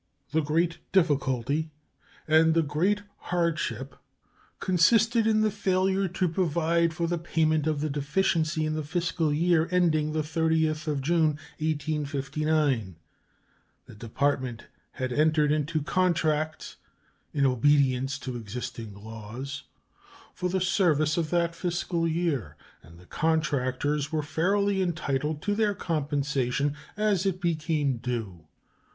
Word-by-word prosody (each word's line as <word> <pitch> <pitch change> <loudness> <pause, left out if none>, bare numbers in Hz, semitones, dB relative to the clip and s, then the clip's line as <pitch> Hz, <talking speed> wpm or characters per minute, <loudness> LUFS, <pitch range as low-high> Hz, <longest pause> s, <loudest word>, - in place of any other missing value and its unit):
The 160 +2 +2
great 165 +3 0
difficulty 145 -4 +1 0.6
and 160 +1 +5
the 165 - +4
great 180 +8 0 0.3
hardship 155 -8 -1 0.6
consisted 220 +6 +3
in 215 -1 +3
the 215 -1 +2
failure 190 -1 +1
to 185 +1 0
provide 170 -1 +1
for 170 +1 -2
the 170 0 -1
payment 155 -2 +1
of 155 -2 0
the 155 - -1
deficiency 155 +2 0
in 155 - -1
the 155 - -2
fiscal 165 0 -1
year 165 +1 +2
ending 160 -4 +2
the 155 -1 0
30th 160 0 0 0.2
June, 155 0 +2 0.2
1859. 150 - -1 0.9
The - - -13
Department 125 +2 -2 0.3
had 130 -1 -3
entered 150 +1 +3
into 155 0 0
contracts, 155 -3 0 0.5
in 140 -2 +1
obedience 135 0 +2
to 130 -3 -5
existing 115 -1 -6
laws, 110 +6 -8 0.7
for 180 - -2
the 190 +1 0
service 165 -5 +2
of 165 -3 -1
that 170 -1 +1
fiscal 170 -1 -1
year, 150 - -1 0.2
and 85 +3 -16
the 90 - -16
contractors 145 - 0
were 155 -1 -1
fairly 195 +6 +1
entitled 150 -4 -1
to 205 - 0
their 210 -1 +1
compensation 145 -4 -1 0.2
as 205 -3 +1
it 185 -1 -1
became 155 -6 0
due. 115 -9 -5
155 Hz, 120 wpm, -27 LUFS, 140-170 Hz, 0.9 s, and